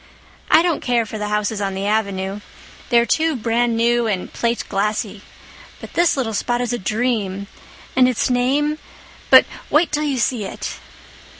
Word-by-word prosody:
I 325 - +6
don't 345 -3 0
care 240 -2 +1
for 220 0 -7
the 210 - -2
houses 210 0 -1
on 195 -1 -2
the 195 +1 -3
Avenue. 200 -2 -1 0.5
They're 235 -1 +4
too 320 +4 +1
brand 235 0 0
new 235 0 +2
and 195 -4 -3
plateglassy. 210 -2 -2 0.6
But - - -11
this 345 -3 +2
little 235 -4 -1
spot 240 +3 -1
is 245 0 -1
a 240 - -2
dream—and 215 +3 -1
its 250 - 0
name—but 275 +5 +2 0.2
wait 325 +3 +3
till 300 0 0
you 290 -3 -1
see 240 -2 0
it." - - -6
235 Hz, 155 wpm, -20 LUFS, 210-255 Hz, 0.6 s, I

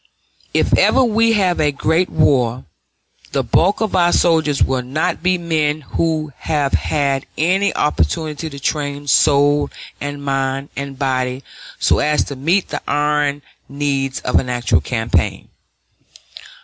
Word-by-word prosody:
If - - +2
ever 265 - +4
we 230 0 +2
have 185 -5 +1
a 150 -1 +2
great 160 +5 0
war, 130 -6 +1 0.7
the - - +1
bulk 195 +6 +2
of 220 -3 -1
our 175 -1 +3
soldiers 160 -5 +2
will 130 -1 0
not 135 +7 -2
be 180 +1 +2
men 155 -3 -1
who 155 0 -2
have 145 -3 -1
had 140 -3 0
any 190 +5 +2
opportunity 150 - -1
to 140 -2 -9
train 145 0 -3
soul 145 +1 +3 0.3
and 145 0 -5
mind 135 0 -2
and 140 -1 -6
body 130 -1 -1 0.3
so - - +2
as 150 0 +2
to 140 - -7
meet 165 +9 0
the - - -4
iron 145 -1 0 0.3
needs 140 -1 -2
of - - +2
an 125 - -4
actual 120 -8 +1
campaign. 110 - -1
145 Hz, 140 wpm, -18 LUFS, 135-160 Hz, 0.7 s, ever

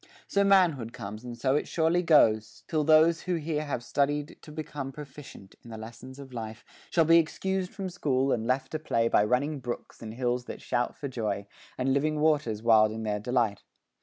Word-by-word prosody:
So 200 - +2
manhood 170 - +3
comes 105 +3 -7
and 120 -1 -7
so 130 +3 +1
it 150 - 0
surely 165 +2 +2
goes, 110 -10 +3
Till 155 -2 0
those 160 +2 +5
who 180 -1 -1
here 155 -1 -2
have 125 -4 -3
studied 145 +3 -1
to 150 - -12
become 150 -3 -5
Proficient 140 -7 -11
in 120 - -13
the 110 - -7
lessons 120 +4 -10
of 140 -1 -10
this - - -16
life, 110 0 -7 0.2
Shall 165 -2 +3
be 165 +1 +7
excused 190 +3 -2
from 195 -2 -5
school, 135 -6 0
and 115 -2 -1
left 130 +1 0
to 155 - -2
play 115 -6 +1
By 105 - +4
running 135 +7 0
brooks 120 -2 -7
and 110 -1 -7
hills 125 0 -1
that - - -7
shout 120 0 -1
for 140 - -5
joy, 105 -6 -3 0.3
And 130 +1 +1
living 150 +2 +1
waters 145 -9 +1
wild 110 -2 +5
in 110 0 -5
their 105 -1 -1
delight. 115 -2 0
135 Hz, 205 wpm, -28 LUFS, 115-155 Hz, 0.3 s, be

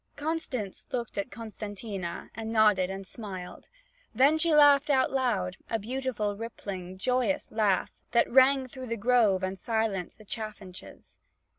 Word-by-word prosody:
Constance 285 - -3
looked 240 -3 -3
at 200 - -3
Costantina, 205 -5 -6
and 225 0 -5
nodded 210 -5 +4
and 195 0 -6
smiled. 190 -4 -8 0.5
Then 280 +6 +5
she 335 +1 +2
laughed 290 -1 +6
out 265 -2 +3
loud, 210 -9 0
a 225 - +1
beautiful 225 -2 -2
rippling, 195 -4 -6
joyous 255 +7 0
laugh 210 -4 +1 0.2
that 235 -1 +3
rang 265 +1 +5
through 255 0 -9
the 230 0 -2
grove 215 -4 +3
and 190 0 -3
silenced 220 -4 -1
the 215 - -15
chaffinches. 210 -4 -9
225 Hz, 140 wpm, -29 LUFS, 195-255 Hz, 0.5 s, laughed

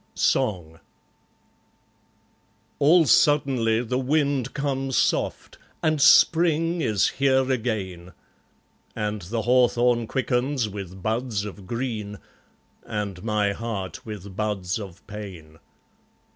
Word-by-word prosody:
Song 85 -6 0 2.0
All 160 +4 +5
suddenly 130 -6 +3
the 125 +2 -2
wind 140 -1 0
comes 135 -2 -1
soft, - - -1 0.2
And 155 -2 +1
Spring 165 +2 +4
is 105 -8 +2
here 135 -1 +1
again; 95 -8 -3 0.8
And 105 -1 -3
the 110 +6 -3
hawthorn 120 -1 +3
quickens 130 0 0
with 95 -2 -8
buds 110 -2 -1
of 100 -2 -9
green, 110 -4 -4 0.7
And 100 -4 -5
my 105 -2 +1
heart 100 -5 -5
with 100 -3 -8
buds 100 -3 -2
of 95 -4 -10
pain. 90 -7 -10
115 Hz, 100 wpm, -24 LUFS, 100-130 Hz, 2.0 s, All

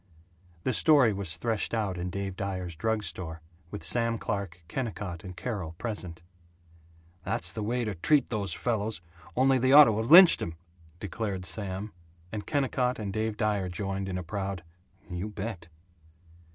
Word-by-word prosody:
The 130 - 0
story 135 -3 +5
was 95 -4 -3
threshed 115 +3 -1
out 105 -4 -1
in 90 +1 -3
Dave 95 0 -4
Dyer's 95 -3 -4
drug 110 +6 -1
store, 80 -2 -5 0.3
with 80 - -7
Sam 115 +6 +2
Clark, 95 -5 -4
Kennicott, 105 -7 -4
and 90 -2 -9
Carol 95 -10 -4
present. 90 -4 -5 1.0
"That's 90 0 0
the 110 - -5
way 120 +4 -1
to 105 - -2
treat 140 - +2
those 105 -4 -2
fellows 110 -4 -1 0.4
only 130 0 +4
they 130 +1 +2
ought 150 +1 +12
to 110 -6 +2
have 110 +1 -2
lynched 175 +2 +9
him!" 80 - -4 0.4
declared 100 -1 -4
Sam, 95 +4 -3 0.4
and 105 -2 -5
Kennicott 130 -3 0
and 100 -3 -4
Dave 110 0 -2
Dyer 105 -4 0
joined 95 +1 -3
in 90 - -3
a 90 - -4
proud 95 0 -4 0.4
"You 90 +3 -4
bet!" 100 -4 -6
100 Hz, 160 wpm, -28 LUFS, 90-115 Hz, 1.0 s, ought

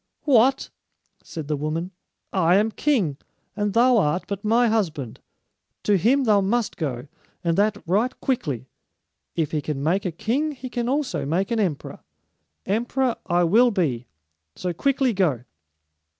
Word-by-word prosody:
"What?" 265 -1 +3 0.5
said 160 -3 -7
the 150 - 0
woman. 155 +5 -3 0.4
"I 180 -2 +3
am 215 +3 +2
king, 215 - 0 0.4
and 205 -1 -1
thou 240 +1 +5
art 175 0 +1
but 200 0 -5
my 230 +3 +3
husband. 160 - -1 0.6
To 205 - +3
him 250 +9 +3
thou 210 -4 +4
must 220 +3 0
go, 130 -6 -4 0.4
and 170 -1 +1
that 210 +2 +2
right 210 +9 0
quickly. 145 - -2 0.7
If 160 -3 -1
he 155 - -1
can 140 -1 -4
make 180 +6 +1
a 180 - -2
king, 260 - -1
he 255 -2 -8
can 240 -1 -2
also 260 - -1
make 175 - -1
an 230 - +1
emperor. 175 -9 -2 0.7
Emperor 240 +4 0
I 175 -1 +2
will 225 +9 +5
be, 140 - -1 0.5
so 180 -1 -3
quickly 270 +5 +1
go." 160 - +1
200 Hz, 150 wpm, -23 LUFS, 160-240 Hz, 0.7 s, thou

